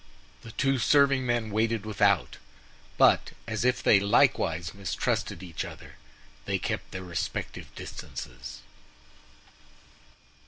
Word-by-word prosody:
The 115 Hz, -, -10 dB
two 135 Hz, -1 st, +1 dB
serving 140 Hz, 0 st, +4 dB
men 120 Hz, -2 st, 0 dB
waited 110 Hz, 0 st, 0 dB
without; 100 Hz, -3 st, +2 dB, 0.6 s
but -, -, +4 dB
as 110 Hz, +1 st, -2 dB
if 125 Hz, 0 st, +1 dB
they 100 Hz, -, +6 dB
likewise 85 Hz, -4 st, +2 dB
mistrusted 100 Hz, -1 st, -2 dB
each 85 Hz, -4 st, -4 dB
other, -, -, -11 dB, 0.5 s
they -, -, 0 dB
kept -, -, -3 dB
their 95 Hz, -, -6 dB
respective 85 Hz, -4 st, -4 dB
distances. 60 Hz, 0 st, -8 dB
105 Hz, 110 wpm, -28 LUFS, 95-120 Hz, 0.6 s, they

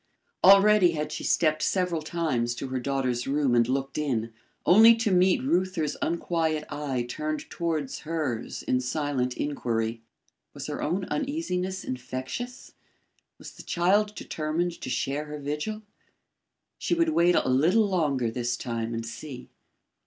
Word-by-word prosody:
Already 195 Hz, -2 st, +7 dB
had 150 Hz, -1 st, -3 dB
she -, -, -5 dB
stepped 155 Hz, -2 st, +2 dB
several 180 Hz, -4 st, 0 dB
times 150 Hz, -8 st, -1 dB
to 135 Hz, -, -5 dB
her 130 Hz, 0 st, -2 dB
daughter's 130 Hz, -2 st, -1 dB
room 140 Hz, -2 st, +1 dB
and 120 Hz, -1 st, +4 dB
looked 135 Hz, +2 st, -1 dB
in, 115 Hz, -6 st, -1 dB, 0.3 s
only 225 Hz, +5 st, +8 dB
to 225 Hz, -2 st, 0 dB
meet 185 Hz, +6 st, +3 dB
Reuther's 180 Hz, -, 0 dB
unquiet 165 Hz, -2 st, 0 dB
eye 135 Hz, -5 st, -2 dB
turned 155 Hz, +4 st, -4 dB
towards 160 Hz, -5 st, -2 dB
hers 150 Hz, -8 st, -3 dB
in 125 Hz, -, +1 dB
silent 130 Hz, -1 st, -1 dB
inquiry. 115 Hz, -5 st, -2 dB, 0.5 s
Was -, -, -6 dB
her -, -, -4 dB
own 180 Hz, +5 st, -1 dB
uneasiness 190 Hz, -, -2 dB
infectious? 130 Hz, -, -6 dB, 0.7 s
Was -, -, -10 dB
the -, -, -12 dB
child 205 Hz, +4 st, +1 dB
determined 165 Hz, +3 st, -3 dB
to -, -, -5 dB
share 140 Hz, +4 st, -1 dB
her 150 Hz, 0 st, -7 dB
vigil? 150 Hz, +10 st, -4 dB, 1.0 s
She -, -, 0 dB
would 335 Hz, -1 st, +2 dB
wait 175 Hz, -, +4 dB
a -, -, +2 dB
little 165 Hz, -, +4 dB
longer 145 Hz, -, 0 dB
this 120 Hz, 0 st, -2 dB
time 115 Hz, -2 st, -3 dB
and 115 Hz, 0 st, -4 dB
see. 125 Hz, +2 st, -8 dB
150 Hz, 145 wpm, -27 LUFS, 130-180 Hz, 1.0 s, only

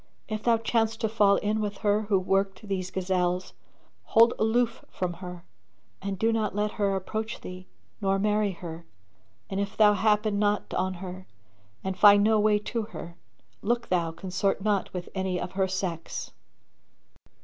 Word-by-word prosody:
if 215 Hz, -1 st, -3 dB
thou 230 Hz, 0 st, +3 dB
chance 225 Hz, 0 st, 0 dB
to 225 Hz, -, 0 dB
fall 210 Hz, -2 st, +4 dB
in 210 Hz, +2 st, 0 dB
with 205 Hz, -1 st, -3 dB
her 205 Hz, +1 st, +2 dB
who 200 Hz, -, +4 dB
worked 195 Hz, +3 st, 0 dB
these 185 Hz, -2 st, -2 dB
gazelles, 180 Hz, -1 st, -1 dB, 0.5 s
hold 230 Hz, +1 st, +5 dB
aloof 230 Hz, +1 st, +1 dB
from 180 Hz, -1 st, -3 dB
her 180 Hz, 0 st, -9 dB, 0.6 s
and 195 Hz, 0 st, -3 dB
do 225 Hz, +4 st, +2 dB
not 215 Hz, -3 st, -1 dB
let 210 Hz, 0 st, 0 dB
her 200 Hz, -2 st, 0 dB
approach 220 Hz, +4 st, -4 dB
thee 185 Hz, 0 st, -9 dB, 0.3 s
nor 195 Hz, -1 st, +2 dB
marry 210 Hz, +1 st, +2 dB
her; 170 Hz, -2 st, -8 dB, 0.6 s
and 195 Hz, -, -3 dB
if 200 Hz, +1 st, -3 dB
thou 210 Hz, -1 st, +6 dB
happen 210 Hz, 0 st, +2 dB
not 205 Hz, 0 st, 0 dB
on 185 Hz, 0 st, 0 dB
her 185 Hz, +1 st, -8 dB, 0.6 s
and 190 Hz, -1 st, -3 dB
find 205 Hz, -1 st, +8 dB
no 215 Hz, 0 st, +4 dB
way 210 Hz, 0 st, +4 dB
to 230 Hz, +3 st, -3 dB
her, 170 Hz, -5 st, -8 dB, 0.5 s
look 235 Hz, +2 st, -1 dB
thou 175 Hz, -2 st, +1 dB
consort 190 Hz, +3 st, -1 dB
not 205 Hz, -2 st, +1 dB
with 180 Hz, -1 st, -5 dB
any 190 Hz, -2 st, -1 dB
of 175 Hz, 0 st, -4 dB
her 190 Hz, 0 st, +1 dB
sex. 185 Hz, -3 st, -4 dB
200 Hz, 165 wpm, -27 LUFS, 185-215 Hz, 0.6 s, find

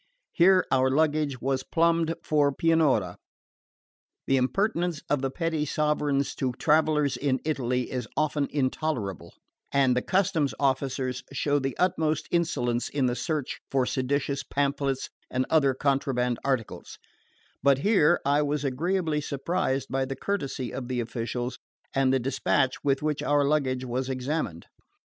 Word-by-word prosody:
Here 185 Hz, +1 st, +5 dB
our 130 Hz, 0 st, +3 dB
luggage 150 Hz, -1 st, +1 dB
was 135 Hz, 0 st, 0 dB
plumbed 165 Hz, +2 st, +1 dB
for 145 Hz, -2 st, +2 dB
Pianura. 140 Hz, -, +2 dB, 1.1 s
The 135 Hz, -, +2 dB
impertinence 175 Hz, -, 0 dB
of 145 Hz, -2 st, +2 dB
the 135 Hz, -, 0 dB
petty 160 Hz, +1 st, -1 dB
sovereigns 150 Hz, -2 st, 0 dB
to 130 Hz, -2 st, -1 dB
travellers 150 Hz, -2 st, +2 dB
in 130 Hz, 0 st, 0 dB
Italy 125 Hz, -5 st, -1 dB
is 125 Hz, -3 st, -3 dB
often 150 Hz, -2 st, +1 dB
intolerable, 130 Hz, -, -2 dB, 0.4 s
and 135 Hz, -3 st, +3 dB
the 125 Hz, -, +1 dB
customs 175 Hz, -6 st, +1 dB
officers 130 Hz, -2 st, 0 dB
show 145 Hz, +1 st, +1 dB
the 135 Hz, 0 st, -3 dB
utmost 160 Hz, -4 st, +1 dB
insolence 125 Hz, -8 st, 0 dB
in 140 Hz, -2 st, 0 dB
the 125 Hz, -1 st, +1 dB
search 155 Hz, -1 st, -3 dB
for 135 Hz, -2 st, +1 dB
seditious 140 Hz, +2 st, -1 dB
pamphlets 140 Hz, -1 st, -1 dB, 0.2 s
and 130 Hz, 0 st, 0 dB
other 140 Hz, -5 st, +4 dB
contraband 130 Hz, -3 st, 0 dB
articles; 130 Hz, -5 st, -3 dB, 0.6 s
but 140 Hz, 0 st, +4 dB
here 175 Hz, -1 st, +3 dB
I 145 Hz, +1 st, +3 dB
was 145 Hz, -1 st, -1 dB
agreeably 160 Hz, +3 st, 0 dB
surprised 140 Hz, 0 st, -1 dB
by 135 Hz, 0 st, 0 dB
the 135 Hz, +1 st, -5 dB
courtesy 135 Hz, -7 st, -3 dB
of 130 Hz, -2 st, -5 dB
the 125 Hz, -1 st, -2 dB
officials 120 Hz, +1 st, -3 dB, 0.3 s
and 135 Hz, -1 st, +2 dB
the 135 Hz, -, +3 dB
despatch 130 Hz, +1 st, 0 dB
with 140 Hz, 0 st, +1 dB
which 150 Hz, -1 st, -1 dB
our 145 Hz, -1 st, +2 dB
luggage 135 Hz, -3 st, 0 dB
was 130 Hz, +2 st, -2 dB
examined. 130 Hz, -, -3 dB
140 Hz, 140 wpm, -27 LUFS, 130-155 Hz, 1.1 s, Here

